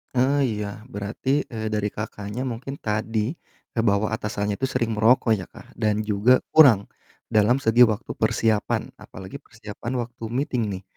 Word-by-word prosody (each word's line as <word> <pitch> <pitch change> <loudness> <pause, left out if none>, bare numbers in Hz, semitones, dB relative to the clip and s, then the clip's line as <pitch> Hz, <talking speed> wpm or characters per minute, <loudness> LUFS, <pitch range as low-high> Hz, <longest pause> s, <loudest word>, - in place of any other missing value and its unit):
Ah, 135 +2 +3
iya. 105 -1 -4
Berarti, 115 +8 -1
eee, 110 -2 -4
dari 105 -1 0
Kakaknya 105 +4 -5
mungkin 130 +3 -5
tadi 110 +2 -1 0.4
kebawa 110 -1 +1
atasannya 105 -2 -2
itu 135 - 0
sering 115 -4 -1
merokok 115 +2 +4
ya 95 -4 -3
Kak, - - -15
dan 110 -1 0
juga 105 +5 +4 0.2
kurang 125 -11 +7 0.4
dalam 110 +4 +3
segi 120 -2 +3
waktu 110 -1 +3
persiapan, 110 -1 0
apalagi 95 +9 -10
persiapan 110 +1 -8
waktu 120 -1 -15
meeting 125 -3 -1
nih. 95 -1 -5
110 Hz, 150 wpm, -24 LUFS, 105-125 Hz, 0.4 s, kurang